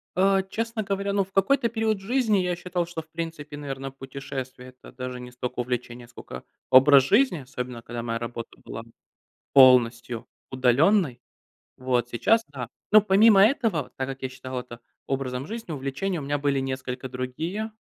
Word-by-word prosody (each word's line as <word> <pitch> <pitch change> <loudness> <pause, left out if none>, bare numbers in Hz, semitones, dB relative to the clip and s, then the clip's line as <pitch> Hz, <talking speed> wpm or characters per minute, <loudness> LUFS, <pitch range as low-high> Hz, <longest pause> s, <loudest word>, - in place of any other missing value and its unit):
Э, 195 +1 +4
честно 225 0 -2
говоря, 200 0 -2
ну, 200 -1 +2
в 190 - -16
какой-то 235 +6 +2
период 220 -2 0
жизни 225 -2 +2
я 180 -1 0
считал, 175 0 -2
что, 165 -1 -6
в 160 - -24
принципе, 160 -3 -6
наверно, 135 -2 -5
путешествия- 135 -1 -7
это - - -14
даже 125 0 -6
не 125 0 -9
столько 125 0 -5
увлечение, 125 -1 -4
сколько 65 - -10 0.3
образ 135 +1 +7
жизни, 210 - +3
особенно, 125 -3 -6
когда 120 0 -6
моя 115 -1 -2
работа 115 0 -6
была 115 - -7 0.7
полностью 120 -3 +5 0.2
удаленной. 130 - +3 0.6
Вот, 125 -2 0
сейчас- 225 - +3
да. 130 -5 -6 0.2
Ну, 215 - +8
помимо 200 0 +6
этого, 210 - +2
так 130 - -2
как 135 0 -7
я 130 - -1
считал 130 0 -6
это 120 -1 -11 0.3
образом 135 0 -3
жизни, 225 -6 -6
увлечения 150 +7 -3
у - - -6
меня 145 +1 -1
были 140 -1 +1
несколько 130 -1 -4
другие. 160 - -4
135 Hz, 165 wpm, -25 LUFS, 125-195 Hz, 0.7 s, Ну